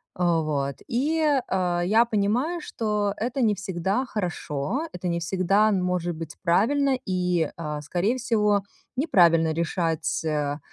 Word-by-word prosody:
А 175 -2 +2
вот 140 -3 -2
и, 300 +7 0 0.3
а, 180 -2 0
я 220 +5 +4
понимаю, 235 +11 0
что 210 -6 -1
это 250 +4 -2
не 215 -3 +3
всегда 195 +5 -2
хорошо, 185 - -3
это 180 0 -5
не 170 - 0
всегда 190 +5 +2
н 190 -3 +1
может 175 -2 -1
быть 160 -2 -7
правильно 260 +10 +2
и, 180 -3 0
а, 150 -2 -4
скорее 180 - 0
всего, 210 -5 +1 0.3
неправильно 170 - +4
решать, 165 -1 -1
а, 150 -1 -1
185 Hz, 140 wpm, -25 LUFS, 165-220 Hz, 0.3 s, я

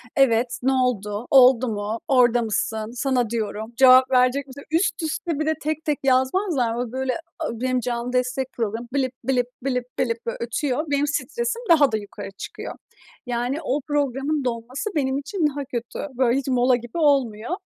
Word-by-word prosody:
evet, 245 -2 +2
"Ne 265 +1 +3
oldu, 235 -4 -1
oldu 255 -2 +6
mu, 215 0 -3
orada 245 -3 +4
mısın, 220 0 -2
sana 250 -3 0
diyorum, 220 0 -4
cevap 260 0 +7
verecek 255 +2 +3
misin?" 280 +2 -11
üst 330 +1 +1
üste 315 0 -2
bir 310 - 0
de 315 - +2
tek, 310 +1 -3
tek 300 -2 0
yazmazlar 260 - +2
mı? 240 - -2
O 245 -2 -4
böyle, 260 0 -1 0.3
a 320 - -2
benim 255 -1 +1
canlı 240 +1 -3
destek 250 +1 -1
programım 230 +1 -3
blip, 265 -2 0
blip, 250 -1 +1 0.2
blip, 250 -2 0
blip 230 -1 -1
böyle 230 - -3
ötüyor. 255 +4 -1
Benim 285 +1 +2
stresim 470 - -2
daha 295 -6 +6
da 220 - +1
yukarı 205 -1 -8
çıkıyor. - - -7 0.5
Yani 245 +3 -1
o 285 0 -1
programın 285 0 0
dolması 245 - -3
benim 265 -2 +1
için 305 +4 -1
daha 285 -1 -5
kötü. 240 -2 -5 0.2
Böyle 250 -1 +3
hiç 275 - -7
mola 250 -1 +3
gibi 240 +3 -7
olmuyor. 270 -7 +1
255 Hz, 175 wpm, -23 LUFS, 235-280 Hz, 0.5 s, cevap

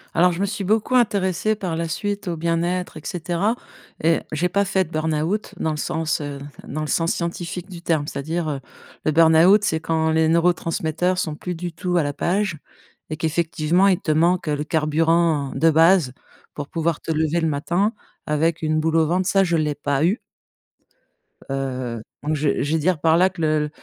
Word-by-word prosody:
Alors, 180 +2 +5
je 170 - -5
me 200 - +2
suis 210 0 -4
beaucoup 215 +6 +1
intéressée 205 -2 +2
par 185 -5 -3
la 165 0 -2
suite 205 +4 -3
au 170 - -1
bien-être 170 +2 -1
et - - -9
cetera 180 +7 -1 0.5
et 165 +1 +3
j'ai 170 +4 0
pas 200 0 +1
fait 190 -1 +1
de - - -15
burn-out 160 +6 -1
dans 160 - 0
le 150 - -3
sens, 160 +1 -1
heu, 145 -1 -5 0.3
dans 155 +3 -4
le 155 - -3
sens 165 +2 +1
scientifique 175 +2 -4
du 175 -2 -9
terme. 155 -3 0
C'est-à-dire, 155 +3 -3
heu, 140 -2 -3 0.5
le 155 - +3
burn-out, 165 +6 +6
c'est 160 -6 +1
quand 160 0 0
les 160 0 +3
neurotransmetteurs 170 +1 +1
sont 155 -4 -2
plus 180 +3 -5
du 175 0 -5
tout 175 +2 -1
à 165 - +3
la 145 0 -2
page 185 +1 -1 0.5
et 155 - -3
qu'effectivement, 165 +3 +1
il 185 -3 +3
te 155 - -1
manque 170 +2 +2
le 150 0 -1
carburant 160 -1 +1
de 160 +4 +3
base 165 -3 +4 0.4
pour 145 -1 -6
pouvoir 165 -2 -1
te 160 - -3
lever 160 +1 +1
le 160 - 0
matin 175 +9 0 0.3
avec 160 +2 0
une 155 0 +1
boule 160 +1 0
au 160 - +4
ventre, 180 +2 0
ça, 195 -1 +4
je 170 -2 +1
l'ai 150 -2 0
pas 145 0 -1
eu. 200 +7 +1 1.3
Heu, 130 -4 -3 0.2
donc 155 +1 0
je 145 -1 0
je 145 +3 -1
vais 160 - +2
dire 165 0 +1
par 160 +1 +3
là 185 +1 +4
que 180 -3 -9
le 155 -1 +1
165 Hz, 200 wpm, -22 LUFS, 155-180 Hz, 1.3 s, burn-out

